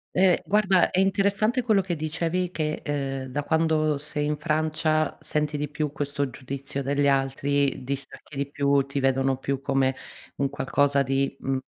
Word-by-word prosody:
Uhm, 185 -1 +5
guarda, 195 -3 +3
è 185 - 0
interessante 200 +5 +2
quello 220 -5 +3
che 180 -2 -3
dicevi 165 +3 -1
che, 155 -3 -2
uhm, 135 -2 -2
da 145 +3 -2
quando 155 -2 +1
sei 150 0 -3
in 150 0 -1
Francia 155 0 0
senti 150 0 -1
di 150 -1 -2
più 150 -1 -2
questo 145 -1 -2
giudizio 140 +2 -5
degli 140 +1 +1
altri, 135 0 +1
distacchi 140 +2 -6
di 140 0 -2
più, 140 0 +2
ti 140 0 -2
vedono 135 0 +2
più 135 0 -2
come 135 -1 +1 0.4
un 140 -1 0
qualcosa 140 0 +1
di, 135 +1 0
mhmm, 135 0 -1
145 Hz, 165 wpm, -26 LUFS, 140-160 Hz, 0.4 s, Uhm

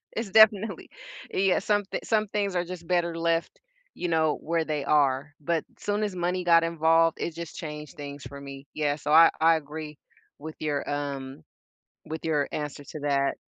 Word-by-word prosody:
It's 225 -2 -3
definitely 215 +1 +4 0.4
Yeah. 190 -1 +3
Some 205 0 +1
thi - - -4
some 215 -1 +1
things 200 -2 -1
are 175 - +1
just 175 -1 -8
better 170 -2 0
left, 165 - -1 0.4
you 180 - -3
know, 160 -2 +2
where 165 0 0
they 150 -3 -3
are, 145 -1 +2
but, 165 +1 0 0.2
soon 205 +1 -1
as 205 -3 -2
money 180 +1 -1
got 170 -1 +5
involved, 165 0 +3
it 165 - -3
just 170 -1 -7
changed 150 0 -7
things 145 -1 -7
for 140 - -10
me. 140 0 -10
Yeah. 145 -2 0
So 150 0 -3
I 165 +1 +8
I 165 0 +6
agree 150 0 -8 0.4
with 155 +2 -7
your 150 -2 -1
with - - -7
your, - - -6
um 140 - -4 0.6
with 160 +1 -6
your 150 -3 +1
answers 145 -1 -5
to 155 - -7
that. 140 -1 +1
160 Hz, 190 wpm, -27 LUFS, 145-175 Hz, 0.6 s, I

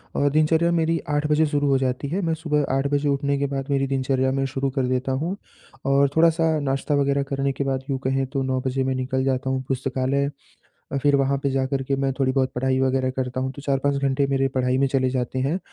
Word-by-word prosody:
और 145 0 +2
दिनचर्या 160 +3 +3
मेरी 165 0 +1
8 145 0 0
बजे 150 +1 +3
शुरू 145 -1 0
हो 135 - +4
जाती 130 +1 -1
है 190 +5 -1
मैं 165 - +1
सुबह 150 -2 0
8 135 +1 +1
बजे 145 0 +1
उठने 140 0 0
के 140 - +1
बाद 135 -1 -3
मेरी 135 -1 +1
दिनचर्या 130 -1 0
मैं 135 0 0
शुरू 135 +1 -2
कर 135 - +2
देता 130 +1 -1
हूँ। 160 +9 -1 0.5
और 140 0 +3
थोड़ा-सा 160 -1 +3
नाश्ता 140 +1 -1
वग़ैरह 140 0 +1
करने 135 0 -1
के 140 - -2
बाद 135 -1 -2
यूँ 135 - 0
कहें 135 +1 +1
तो 135 +1 -2
9 130 0 0
बजे 130 +1 0
मैं 130 0 -1
निकल 130 +1 -1
जाता 130 0 0
हूँ 130 0 0
पुस्तकालय, 135 +1 0 0.7
फिर 145 -1 +4
वहाँ 140 0 +1
पे 140 - +1
जाकर 135 0 -1
के 135 +1 -1
मैं 135 0 0
थोड़ी-बहुत 130 -1 +1
पढ़ाई 130 +1 +1
वग़ैरह 130 0 +1
करता 130 -1 -2
हूँ 130 0 -2
तो 140 0 -10
4-5 140 0 0
घंटे 140 0 +1
मेरे 135 -1 +1
पढ़ाई 125 0 +1
में 135 - +3
चले 130 -1 +1
जाते 130 0 -2
हैं। 140 +7 0
135 Hz, 230 wpm, -23 LUFS, 130-140 Hz, 0.7 s, हो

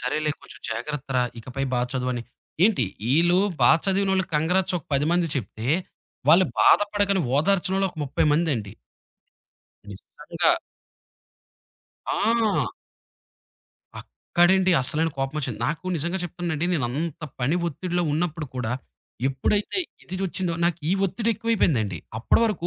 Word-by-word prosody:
సరేలే 150 +4 0
కొంచెం - - -13
జాగ్రత్త 135 +5 -4
రా! 125 - +4 0.2
ఇకపై 130 +4 -4
బా 125 - +1
చదువని 125 -2 -1 0.4
ఏంటి 200 - +3 0.3
ఈళ్ళు 175 +4 +4 0.2
బాగా 160 - +6
చదివినోళ్ళకి 190 -1 +1
కాంగ్రాట్స్ 180 +4 +1
ఒక 145 - -16
10 145 +2 +2
మంది 175 -1 +2
చెప్తే 110 -1 -5 0.6
వాళ్ళు 175 +4 +7 0.2
బాధపడకని 205 - +4 0.2
ఓదార్చినోలు 195 +3 +2
ఒక - - -26
30 135 - 0
మందండి. 140 - 0 1.2
నిజంగా. 100 -1 -1 1.6
ఆ! 225 -1 +1 1.3
అక్కడండి 185 +1 +2
అసలైన 160 +5 +1
కోపం 135 +3 -2
ఒచ్చింది. 125 -5 -4
నాకు 155 +4 -3
నిజంగా 170 +5 -2
చెప్తున్నానండి. 175 -1 -3
నేనంత 150 +3 -2 0.2
పని 140 +8 +1
ఒత్తిడిలో 175 +3 -2
ఉన్నప్పుడు 160 -1 -2
కూడా 120 -1 -2 0.6
ఎప్పుడైతే 205 - 0 0.2
ఇదిదోచ్చిందో 185 -1 -3
నాకీ 170 -1 0 0.2
ఒత్తిడి 230 +4 -1
ఎక్కువైపోయిందండి. 155 - +1 0.2
అప్పడ - - +3
వరకు 200 -6 -1
165 Hz, 115 wpm, -24 LUFS, 135-190 Hz, 1.6 s, వాళ్ళు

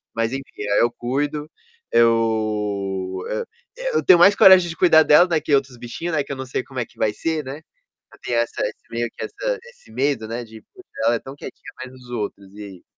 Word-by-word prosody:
Mas, 115 +1 0
enfim, 135 0 -7
aí 105 - +3
eu 120 0 +3
cuido, 145 +5 -3 0.4
eu 105 -5 +1
eh, - - -2 0.3
e - - -3
eu - - 0
tenho 175 -2 +7
mais 200 +3 +7
coragem 185 -2 +7
de 165 - -6
cuidar 160 -3 +6
dela, 160 +5 +6
né, 165 -3 +1
que 150 - -2
outros 135 -3 +1
bichinhos, 160 +8 -5
né, 145 - +1
que - - -10
eu - - -3
não 130 - -5
sei 130 0 -3
como 130 -2 -7
é 120 - -1
que - - -27
vai 105 -1 0
ser, 160 +2 -2
né. 135 +4 -8 0.5
Eu - - -18
tenho 120 - -1
essa 115 - -2
esse - - -8
meio 120 0 -2
que - - -5
essa - - -3
esse 485 0 -18
medo, 130 -5 -1
né, 120 +1 -4
de: 110 0 -13
"Puxa, 375 -1 -16 0.2
ela 120 +1 +3
é - - -2
tão 135 +1 -10
quietinha, - - -10
mas 130 0 -9
os 125 -1 -15
outros, 100 -4 -5
e 105 - -8
aí?" 95 -3 -11
130 Hz, 235 wpm, -21 LUFS, 115-160 Hz, 0.5 s, tenho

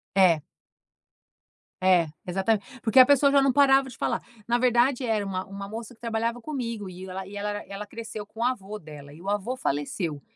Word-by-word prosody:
É. 175 -5 +5 1.4
É, 180 -3 +4 0.2
exatamente. 195 +3 +1 0.2
Porque 225 +3 +4
a 255 - +11
pessoa 280 0 +5
já 280 - +5
não 270 -2 +3
parava 270 -1 +5
de 245 - -12
falar. - - -1 0.3
Na 240 +1 +3
verdade, 250 +1 +3
era 215 -3 0
uma 190 -1 -3
uma 200 0 -7
moça 225 +2 -7
que - - -37
trabalhava 230 +1 -1
comigo. 230 -8 -4
E 185 +1 -9
ela 190 +1 -5
e 205 +2 -9
ela 205 +1 -2 0.2
ela 200 +1 -7
cresceu 225 -1 -7
com 220 +2 -10
o - - +2
avô 215 -4 -2
dela. 150 -4 -11
E 160 - -13
o 195 - -4
avô 205 +5 -1
faleceu 145 - -2
215 Hz, 195 wpm, -26 LUFS, 190-245 Hz, 1.4 s, a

